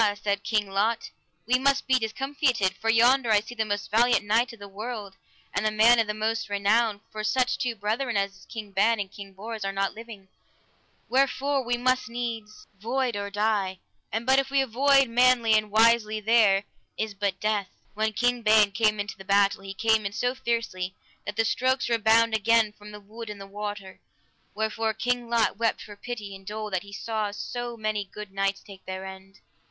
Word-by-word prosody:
said 200 -1 -2
King 215 -2 0
Lot, 215 +4 0 0.3
we 255 +2 +2
must 275 +1 +2
be 260 -1 +3
discomfited, 250 - 0
for 225 - -3
yonder 240 +2 +4
I 215 -1 +5
see 215 +4 -9
the 220 -2 -1
most 205 -1 -3
valiant 235 0 +3
knight 230 +5 +2
of 230 - -12
the 200 -1 -10
world, 210 0 -7 0.4
and - - -1
the 215 - +2
man 225 +3 +5
of 225 - +2
the 210 - -2
most 225 +1 -2
renown, 205 +1 +1
for 215 0 -5
such 250 +3 +1
two 245 -2 -1
brethren 220 +3 -1
as 195 0 -1
is - - -18
King 215 -3 -8
Ban 220 +4 +2
and 195 -2 -4
King 200 -1 -10
Bors 215 +3 -6
are 195 - -1
not 195 0 -1
living, 220 -3 -11 0.8
wherefore 275 +1 +1
we 240 0 -1
must 255 0 +1
needs 230 -3 -5
void 245 +2 -1
or 200 0 -3
die; 205 -2 0 0.3
and 225 +2 -2
but 265 +1 +5
if 270 0 -2
we 275 0 +2
avoid 270 +2 +3
manly 240 -1 +4
and 215 -1 +2
wisely 220 0 +3
there 215 -3 +4 0.3
is 220 -1 -2
but 200 -1 -2
death. 210 -3 -1 0.2
When 220 +1 0
King 245 +3 0
Ban 215 -2 +5
came 215 0 +1
into 205 -1 -5
the - - -9
battle, 200 0 +2
he 195 0 -7
came 220 +1 +2
in 200 0 -4
so 245 +3 0
fiercely 230 -7 -3 0.3
that 205 - -4
the 225 - +1
strokes 255 +2 +1
redounded 225 0 +3
again 225 0 +3
from 210 0 -13
the 210 - -9
wood 220 +2 -10
and 210 -1 -7
the 195 - -8
water; 205 -1 -7 0.6
wherefore 220 +1 -1
King 245 +1 -1
Lot 230 -4 +1
wept 230 0 0
for 205 - -11
pity 205 -2 -7
and 195 - -13
dole 210 +1 -5
that 185 -2 0
he 200 - -13
saw 215 +1 -3
so 240 +3 -5
many 215 -1 -1
good 210 -2 -9
knights 195 0 -1
take 195 -2 -13
their 190 0 -5
end. 190 0 -11
220 Hz, 200 wpm, -26 LUFS, 205-235 Hz, 0.8 s, I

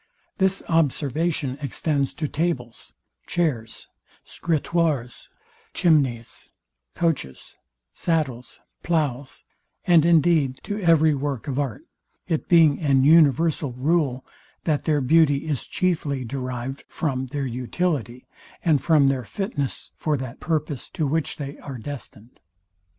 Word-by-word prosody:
This 190 0 +2
observation 150 -2 0
extends 140 0 -1
to 155 - -2
tables, 140 -7 -3 0.3
chairs, 145 -11 -2 0.4
scritoires, 155 -6 -1 0.5
chimneys, 140 -10 +1 0.5
coaches, 155 - -2 0.4
sadles, 140 -8 -2 0.2
ploughs, 145 -6 -2 0.4
and 170 -3 +5
indeed 160 -5 +3
to 205 0 -4
every 160 -3 +4
work 140 -2 -3
of 135 0 -2
art; 130 -8 -3 0.4
it 160 - -2
being 165 -5 +5
an 135 -5 +3
universal 155 -2 +4
rule, 135 -1 0 0.4
that 155 -3 0
their 150 -2 +2
beauty 145 +1 +3
is 150 -5 -3
chiefly 150 -8 -1
derived 130 +1 -5
from 130 -5 -2
their 140 +1 -3
utility, 125 - -2 0.4
and 155 -5 +3
from 155 -4 +4
their 135 -2 +1
fitness 140 - -4
for 150 -2 -1
that 130 -2 -7
purpose, 155 -5 -2
to 160 - -2
which 155 +2 -1
they 140 -1 -6
are 135 -3 -7
destined. 120 -3 -9
145 Hz, 115 wpm, -24 LUFS, 130-165 Hz, 0.5 s, and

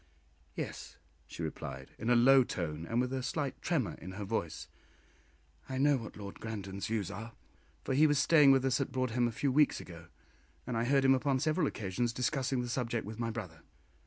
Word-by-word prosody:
"Yes," - - -6 0.3
she - - -7
replied, - - -6
in 115 - -2
a 125 - +5
low 130 +2 +7
tone, 80 -6 -4
and 115 - 0
with 125 +1 0
a 130 - -1
slight 140 +1 -3
tremor 150 - 0
in 95 - -7
her 105 +2 -5
voice, 95 -6 -3 1.0
"I 130 - -3
know 145 +2 +4
what 115 -4 -8
Lord 100 -1 -8
Grandon's 100 -3 -5
views 105 -4 -2
are, 110 +3 -7 0.5
for - - -1
he 150 +4 +5
was 145 -1 +2
staying 145 0 +6
with 135 -1 +4
us 135 +1 +2
at 140 - -2
Broadhem 125 -2 +1
a - - -2
few 135 +4 0
weeks 150 +2 +3
ago, 85 -1 -11 0.6
and 125 - -3
I 115 +1 +1
heard 135 +1 +3
him 135 - +7
upon 135 0 +1
several 155 +2 +1
occasions 110 +3 -2
discussing 130 0 0
the - - -4
subject 120 -2 -2
with 110 +2 -8
my 115 -1 -1
brother." 95 -8 -7
120 Hz, 200 wpm, -32 LUFS, 110-135 Hz, 1.0 s, low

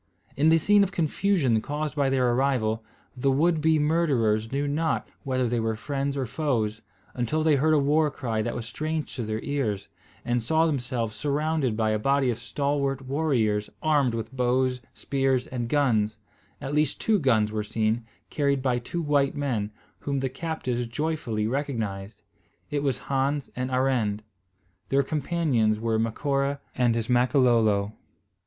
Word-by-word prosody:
In 150 +3 +4
the 165 - +6
scene 205 +6 +4
of 195 - -1
confusion 160 - +1
caused 150 +2 -3
by 140 -2 +2
their 130 -2 +2
arrival, 120 -4 +1 0.3
the 135 +2 +1
would 155 +4 +2
be 160 0 +4
murderers 135 -9 +1
knew 140 +2 -1
not 160 +3 0 0.2
whether 130 -2 0
they 120 0 0
were 110 0 -1
friends 140 +4 -3
or 135 - -1
foes, 115 -5 -1 0.3
until 130 +6 -1
they 155 -2 +4
heard 155 +3 +3
a - - +4
war 150 +2 +3
cry 115 -6 -2
that - - -3
was 120 - -4
strange 155 +5 -3
to 125 - -3
their 110 0 -2
ears, 130 -9 -2 0.4
and 120 0 +1
saw 160 +8 +2
themselves 125 -7 -2
surrounded 145 -2 0
by 110 -1 +1
a 110 - 0
body 135 +2 +2
of 115 - -5
stalwart 140 +1 -1
warriors 130 -7 0
armed 145 -6 +2
with 115 +3 -5
bows, 125 0 +1
spears, 135 -2 0
and 120 -2 -4
guns, 110 -7 +2 0.4
at 140 0 -5
least 150 -1 +1
two 215 -2 +2
guns 110 -8 +2
were 110 0 -1
seen, 110 +2 -1 0.3
carried 140 -3 +1
by 125 -2 +1
two 170 +8 -4
white 145 -2 +2
men, 120 -8 -1 0.3
whom 140 -1 -2
the 135 0 -1
captives 130 -5 -3
joyfully 120 -5 -2
recognised. 110 -6 -3 0.5
It 145 -1 0
was 140 -2 -1
Hans 140 +1 0
and 130 0 -2
Arend. 125 -5 0 0.7
Their 140 +1 +3
companions 140 -8 0
were 115 0 0
Macora 140 +5 0
and 120 -2 +2
his 115 -1 -1
Makololo. 120 -5 +3
130 Hz, 160 wpm, -26 LUFS, 115-145 Hz, 0.7 s, the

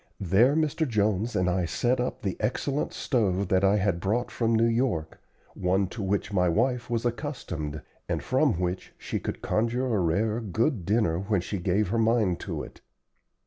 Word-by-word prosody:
There 105 - +4
Mr. 155 0 +1
Jones 105 0 0
and 90 0 +2
I 90 0 +1
set 120 +9 0
up 125 - -3
the 95 -2 -1
excellent 135 +6 -1
stove 100 -6 0
that 95 0 +3
I 100 +1 +4
had 95 -4 +1
brought 110 +7 -1
from 115 -1 +1
New 115 +1 +4
York 115 -9 0 0.3
one 95 +2 +1
to 110 - -6
which 100 +1 -1
my 90 -2 +3
wife 120 +7 0
was 115 0 -1
accustomed, 95 - -4 0.3
and - - -1
from 85 - +2
which 90 0 -3
she - - -4
could - - -5
conjure 115 +4 0
a 105 - +2
rare 105 +6 +1
good 110 - 0
dinner 100 -6 +2
when 100 +1 0
she 95 +2 -4
gave 95 +2 +1
her 115 +3 0
mind 110 -6 +2
to - - -4
it. - - -12
105 Hz, 185 wpm, -27 LUFS, 90-120 Hz, 0.3 s, There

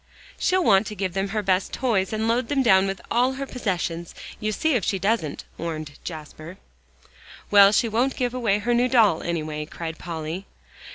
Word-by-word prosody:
"She'll 370 0 +2
want 200 -4 +4
to 210 - -6
give 190 -2 -2
them 195 +1 -1
her 210 +1 -2
best 185 0 +1
toys 215 -7 0
and 220 0 -1
load 230 +1 +1
them 275 0 +1
down 190 -4 +5
with 195 0 -3
all 250 +2 +2
her 275 +1 -4
possessions. 175 -9 -3 0.2
You 215 0 -1
see 315 +9 0
if 235 -6 +1
she 195 - 0
doesn't," 195 -5 -1 0.2
warned 155 -3 -5
Jasper. 155 +2 -8 0.9
"Well, 200 -1 +8
she 230 - +2
won't 240 +5 0
give 245 -1 -1
away 230 -5 +1
her 235 +4 0
new 240 +1 +3
doll, 220 -10 +4
anyway," 155 -3 -3
cried 165 0 -6
Polly. 165 +2 -5
200 Hz, 185 wpm, -24 LUFS, 170-235 Hz, 0.9 s, Well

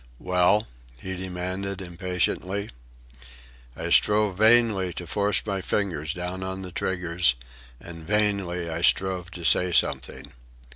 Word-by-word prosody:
"Well?" 90 - +2 0.3
he 95 +4 -5
demanded 95 +1 -4
impatiently. 90 +2 -2 1.1
I 85 +1 -4
strove 105 0 +4
vainly 110 -4 +4
to 90 - -7
force 100 +4 0
my 100 -2 -2
fingers 85 -7 -1
down 90 +2 -5
on 95 0 -4
the 90 - -7
triggers, 85 -5 0 0.4
and 85 -1 -10
vainly 100 -4 0
I 80 0 -4
strove 90 -1 +1
to 90 -1 -9
say 90 +2 +4
something. 70 -3 0
90 Hz, 125 wpm, -25 LUFS, 90-100 Hz, 1.1 s, strove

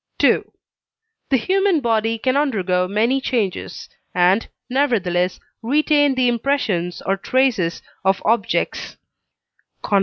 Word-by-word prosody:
The 450 -11 -2
human 380 - +1
body 225 -3 0
can 255 +4 0
undergo 190 -11 +1
many 230 +7 +1
changes, 225 -8 -3 0.3
and, 180 +4 +3 0.2
nevertheless, 200 -10 0 0.2
retain 290 +2 +2
the 255 -1 +2
impressions 225 - -1
or 195 +1 0
traces 225 -7 0 0.2
of 190 0 +2
objects 230 +1 -1 0.9
(cf. 200 - +2
230 Hz, 100 wpm, -20 LUFS, 190-270 Hz, 0.9 s, and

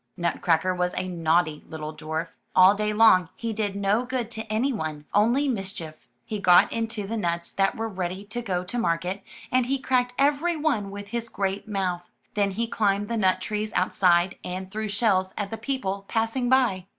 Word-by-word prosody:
Nutcracker 170 0 +1
was 180 0 -1
a 185 - -2
naughty 165 -3 +1
little 155 -1 -6
dwarf. 160 +2 -4 0.3
All 185 +1 +8
day 210 +1 -1
long 210 -5 +5
he 230 -1 -3
did 205 -2 -2
no 200 +4 +1
good 250 -2 -3
to 220 -1 -5
anyone 210 - -1
— - - -37
only 235 +8 +3
mischief. 190 - -5 0.2
He 215 - -4
got 180 -2 +5
into 225 -2 -2
the 225 +3 -3
nuts 170 -4 -2
that 195 +4 +1
were 225 0 -2
ready 185 -1 -4
to 235 +4 -5
go 185 -6 -2
to 215 +7 -3
market, 180 0 -1 0.3
and 255 -1 +2
he 275 +1 +1
cracked 250 -1 0
every 295 +5 +2
one 285 -11 0
with 200 0 -8
his 235 +1 -4
great 195 0 -2
mouth. 185 -4 -2 0.2
Then 200 -1 +2
he 220 +4 -1
climbed 205 -2 0
the 235 - -1
nut 185 -3 +2
trees 210 +2 -3
outside, 180 0 +2
and 185 +1 -5
threw 215 +1 -3
shells 200 -3 +1
at 205 -1 -3
the 225 - -3
people 220 -6 -2
passing 225 +2 0
by. 235 -8 +2
200 Hz, 190 wpm, -25 LUFS, 180-230 Hz, 0.3 s, All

